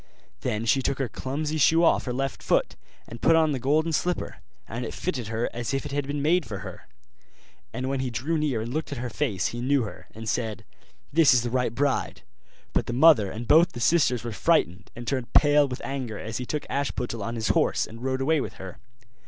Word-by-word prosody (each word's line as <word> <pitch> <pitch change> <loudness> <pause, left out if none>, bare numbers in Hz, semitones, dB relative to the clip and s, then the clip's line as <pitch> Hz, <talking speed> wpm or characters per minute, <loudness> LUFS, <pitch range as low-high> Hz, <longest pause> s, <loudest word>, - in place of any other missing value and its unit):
Then 105 - -2
she 135 +4 +3
took 135 +1 -1
her 135 - -1
clumsy 150 +7 -3
shoe 165 +4 +5
off 165 - +3
her 125 - -2
left 135 +1 -3
foot, - - +1 0.3
and 115 - -10
put 165 - +5
on 160 -1 +3
the 135 - -2
golden 155 +6 +1
slipper; 180 +2 -1 0.3
and 120 +2 -5
it 115 - -5
fitted 130 - -3
her 115 +1 -1
as 120 +3 -2
if 135 - -3
it 145 - -5
had 140 -1 -2
been 145 0 -2
made 175 +3 +3
for 100 -7 -6
her. 90 -2 -10 0.8
And 130 +3 -4
when 135 0 -1
he 130 -1 -1
drew 130 +8 -2
near 140 -7 0
and 115 +3 -5
looked 155 0 -3
at 140 - -4
her 120 0 -4
face 95 -4 -1
he 120 - -5
knew 135 +1 +2
her, 105 - -9
and 110 0 -8
said, 110 -2 -2 0.5
'This 155 -4 +6
is 120 - +3
the 120 - -3
right 125 -2 0
bride.' 140 +1 -1 0.5
But - - 0
the 120 - -2
mother 130 -7 +6
and 115 +4 -6
both 165 +3 +5
the - - -6
sisters 125 -4 +2
were 120 - -4
frightened, 90 -3 +1
and 120 - -7
turned 130 -4 -2
pale 145 -1 +5
with 125 -1 -6
anger 130 -6 -4
as 110 +1 -5
he 125 - -5
took 150 - -3
Ashputtel 125 -5 -2
on 115 +4 -4
his 110 -2 -2
horse, - - +2
and 115 +1 -12
rode 130 +1 -1
away 155 +2 +2
with - - -5
her. 95 -2 -10
130 Hz, 230 wpm, -26 LUFS, 115-145 Hz, 0.8 s, This